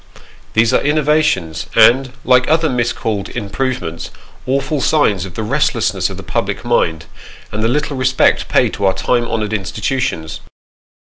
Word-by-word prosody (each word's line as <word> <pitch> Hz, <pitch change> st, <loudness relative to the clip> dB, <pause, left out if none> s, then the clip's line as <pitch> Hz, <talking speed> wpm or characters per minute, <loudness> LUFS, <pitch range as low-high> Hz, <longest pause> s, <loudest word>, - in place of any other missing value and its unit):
These 115 Hz, +2 st, +3 dB
are -, -, +3 dB
innovations, 150 Hz, -, +1 dB
and, 125 Hz, +4 st, +5 dB
like 125 Hz, 0 st, +4 dB
other 160 Hz, +1 st, +3 dB
miscalled 115 Hz, -5 st, -2 dB
improvements, 120 Hz, -6 st, -4 dB, 0.4 s
awful 135 Hz, +2 st, -1 dB
signs 105 Hz, -, +2 dB
of 95 Hz, -2 st, -10 dB
the 110 Hz, -, -3 dB
restlessness 140 Hz, +7 st, 0 dB
of -, -, -8 dB
the -, -, -8 dB
public -, -, -3 dB
mind, 80 Hz, -2 st, 0 dB, 0.5 s
and 105 Hz, -, -3 dB
the -, -, +3 dB
little 145 Hz, +3 st, -1 dB
respect 130 Hz, 0 st, +2 dB
paid -, -, +2 dB
to 100 Hz, -, -2 dB
our 95 Hz, 0 st, +2 dB
time 120 Hz, +5 st, 0 dB
honoured 110 Hz, -2 st, -2 dB
institutions. 105 Hz, -3 st, -2 dB
120 Hz, 145 wpm, -16 LUFS, 100-135 Hz, 0.5 s, and